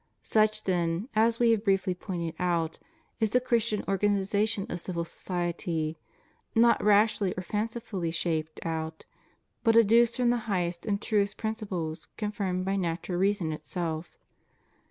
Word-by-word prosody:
Such 215 Hz, 0 st, +2 dB
then, 175 Hz, +3 st, 0 dB
as 225 Hz, +1 st, +4 dB
We 235 Hz, -1 st, +5 dB
have 220 Hz, -2 st, +1 dB
briefly 195 Hz, -3 st, +2 dB
pointed 175 Hz, -3 st, -4 dB
out, 170 Hz, -3 st, 0 dB, 0.4 s
is 220 Hz, -2 st, +2 dB
the 250 Hz, -, +3 dB
Chris 235 Hz, -3 st, +1 dB
tian 210 Hz, -1 st, -1 dB
organization 200 Hz, +1 st, +1 dB
of 175 Hz, -, -4 dB
civil 170 Hz, -2 st, -3 dB
society; 170 Hz, -3 st, -3 dB, 0.6 s
not 235 Hz, +1 st, +5 dB
rashly 210 Hz, -2 st, +3 dB
or 185 Hz, -, -3 dB
fancifully 210 Hz, -3 st, -3 dB
shaped 160 Hz, -2 st, -2 dB
out, 160 Hz, -1 st, -4 dB, 0.6 s
but 225 Hz, -1 st, +4 dB
educed 230 Hz, +1 st, +5 dB
from 245 Hz, -2 st, +3 dB
the 245 Hz, -, +2 dB
highest 175 Hz, -1 st, -1 dB
and 200 Hz, -1 st, +1 dB
truest 205 Hz, -1 st, 0 dB
prin 220 Hz, -1 st, -1 dB
ciples, 180 Hz, -7 st, -5 dB
confirmed 200 Hz, -4 st, -2 dB
by 195 Hz, +1 st, 0 dB
natural 175 Hz, 0 st, -2 dB
reason 195 Hz, -4 st, +1 dB
itself. 165 Hz, 0 st, -4 dB
195 Hz, 145 wpm, -28 LUFS, 170-215 Hz, 0.6 s, We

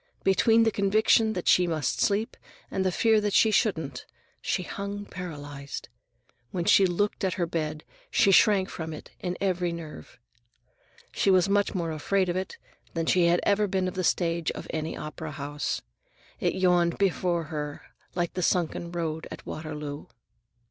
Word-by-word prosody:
Between 225 Hz, +4 st, +4 dB
the 225 Hz, -, +3 dB
conviction 215 Hz, +2 st, +3 dB
that 180 Hz, -3 st, -4 dB
she 180 Hz, -1 st, +5 dB
must 155 Hz, -6 st, -1 dB
sleep 210 Hz, +2 st, +1 dB, 0.4 s
and 190 Hz, -, 0 dB
the 185 Hz, -, +1 dB
fear 220 Hz, +2 st, +3 dB
that 205 Hz, -1 st, -1 dB
she 220 Hz, -, +5 dB
couldn't, 160 Hz, -, 0 dB, 0.3 s
she 185 Hz, -, -1 dB
hung 200 Hz, +2 st, -5 dB
paralyzed. 145 Hz, -7 st, -7 dB, 0.6 s
When 175 Hz, -2 st, -3 dB
she 195 Hz, +1 st, +6 dB
looked 205 Hz, +4 st, -1 dB
at 190 Hz, -2 st, 0 dB
her 175 Hz, -, 0 dB
bed, 155 Hz, -2 st, -3 dB, 0.3 s
she 195 Hz, -, +4 dB
shrank 195 Hz, -1 st, +5 dB
from 160 Hz, -3 st, -6 dB
it 155 Hz, -, -10 dB
in 180 Hz, -1 st, -3 dB
every 180 Hz, -3 st, 0 dB
nerve. 165 Hz, -6 st, -9 dB, 0.9 s
She -, -, +1 dB
was 185 Hz, 0 st, +5 dB
much 205 Hz, 0 st, +1 dB
more 170 Hz, -3 st, -1 dB
afraid 185 Hz, +4 st, 0 dB
of 175 Hz, -, -1 dB
it 185 Hz, 0 st, -4 dB, 0.4 s
than 165 Hz, 0 st, 0 dB
she 175 Hz, 0 st, +4 dB
had 175 Hz, +1 st, +3 dB
ever 205 Hz, +1 st, +2 dB
been 190 Hz, -1 st, 0 dB
of 185 Hz, -, -3 dB
the 185 Hz, -1 st, -2 dB
stage 170 Hz, -1 st, +1 dB
of -, -, -7 dB
any 160 Hz, 0 st, -3 dB
opera 155 Hz, +1 st, -6 dB
house. 145 Hz, 0 st, -3 dB, 0.6 s
It -, -, 0 dB
yawned 175 Hz, -2 st, +3 dB
before 180 Hz, -3 st, +1 dB
her 150 Hz, -1 st, -4 dB, 0.3 s
like 175 Hz, -1 st, -1 dB
the 185 Hz, -, -2 dB
sunken 170 Hz, -1 st, 0 dB
road 160 Hz, -2 st, -3 dB
at -, -, -9 dB
Waterloo. 150 Hz, -2 st, -6 dB
180 Hz, 170 wpm, -27 LUFS, 160-195 Hz, 0.9 s, she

